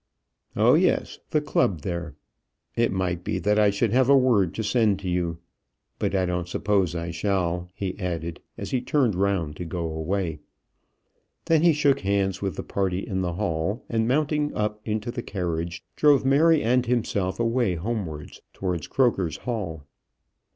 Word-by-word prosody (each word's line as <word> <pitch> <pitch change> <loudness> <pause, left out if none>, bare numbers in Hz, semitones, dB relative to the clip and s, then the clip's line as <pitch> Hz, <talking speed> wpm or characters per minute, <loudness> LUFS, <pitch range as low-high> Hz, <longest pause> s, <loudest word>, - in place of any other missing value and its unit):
"Oh, - - +5
yes; - - +2
the 150 - +2
club 120 - +1
there. 85 -3 -4 0.6
It 115 0 +2
might 90 -2 -1
be - - -1
that 105 +1 +2
I 105 -1 +5
should 100 +2 0
have 130 +1 +4
a 140 - +7
word 110 -9 +3
to 110 - -2
send 110 -2 +2
to 95 - -5
you. 90 -2 -1 0.6
But - - 0
I 95 -1 +2
don't 90 -1 -2
suppose 95 -1 0
I 85 0 -3
shall," 90 -1 -1
he 95 -2 -3
added, 85 -3 -3 0.2
as - - -6
he 130 - +1
turned 125 -3 +2
round 90 -5 0
to - - -4
go 85 0 -4
away. 80 0 -2 1.1
Then 165 -2 +3
he 170 0 +6
shook 145 -2 +3
hands 95 -1 0
with 95 -2 -2
the - - -4
party 95 -1 -1
in 95 -4 -2
the 90 -2 -1
hall, 90 +3 -2
and 115 -1 +1
mounting 150 +2 +1
up 105 0 -2
into 110 +2 -2
the 120 - -4
carriage, 85 -4 -3
drove 145 -3 +4
Mary 155 +4 +4
and 125 +2 +3
himself 105 -6 0
away 115 -4 +1
homewards 85 -5 -5
towards 90 -5 -3
Croker's 100 - +1
Hall. 95 - -4
100 Hz, 170 wpm, -25 LUFS, 90-120 Hz, 1.1 s, a